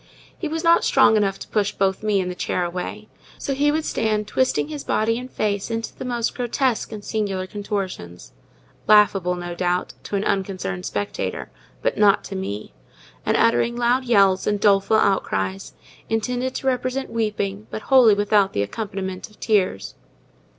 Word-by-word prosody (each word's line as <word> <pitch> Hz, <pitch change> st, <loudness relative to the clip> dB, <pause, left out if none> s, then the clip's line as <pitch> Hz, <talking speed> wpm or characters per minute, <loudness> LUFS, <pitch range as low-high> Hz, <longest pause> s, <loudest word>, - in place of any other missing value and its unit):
He 330 Hz, -, -4 dB
was 320 Hz, +2 st, -3 dB
not 335 Hz, 0 st, +5 dB
strong 220 Hz, -, +5 dB
enough 195 Hz, -2 st, +1 dB
to -, -, -9 dB
push 210 Hz, -1 st, 0 dB
both 190 Hz, -1 st, 0 dB
me 210 Hz, -2 st, +1 dB
and 180 Hz, -1 st, -2 dB
the -, -, -4 dB
chair 180 Hz, 0 st, -2 dB
away, 180 Hz, +4 st, -5 dB, 0.3 s
so 275 Hz, -, -3 dB
he 290 Hz, +2 st, +2 dB
would 315 Hz, +1 st, -1 dB
stand 215 Hz, -1 st, 0 dB
twisting 260 Hz, +5 st, +1 dB
his 300 Hz, -2 st, -6 dB
body 225 Hz, +2 st, 0 dB
and 250 Hz, +1 st, -8 dB
face 205 Hz, -4 st, -2 dB
into 225 Hz, 0 st, -4 dB
the -, -, -7 dB
most 240 Hz, -2 st, -1 dB
grotesque 250 Hz, -1 st, -1 dB
and 210 Hz, -2 st, -8 dB
singular 200 Hz, -4 st, -2 dB
contortions—laughable, 185 Hz, -, -1 dB
no 175 Hz, 0 st, -5 dB
doubt, 180 Hz, +1 st, -1 dB
to -, -, -3 dB
an 200 Hz, -, 0 dB
unconcerned 185 Hz, -, -2 dB
spectator, 100 Hz, 0 st, -4 dB, 0.3 s
but -, -, 0 dB
not 205 Hz, -1 st, +5 dB
to 195 Hz, -, -7 dB
me—and 105 Hz, -, -5 dB
uttering 230 Hz, +1 st, +2 dB
loud 245 Hz, +2 st, +1 dB
yells 195 Hz, -5 st, +3 dB
and 205 Hz, -1 st, +1 dB
doleful 200 Hz, +1 st, +4 dB
outcries, 95 Hz, -, 0 dB, 0.3 s
intended 250 Hz, +3 st, -1 dB
to -, -, -5 dB
represent 255 Hz, +1 st, -1 dB
weeping 210 Hz, -2 st, -2 dB
but 220 Hz, -, -6 dB
wholly 250 Hz, -6 st, +6 dB
without 205 Hz, -1 st, +2 dB
the 100 Hz, -, +1 dB
accompaniment 190 Hz, -, -5 dB
of 210 Hz, -, -22 dB
tears. 195 Hz, -, 0 dB
205 Hz, 165 wpm, -22 LUFS, 185-230 Hz, 0.3 s, wholly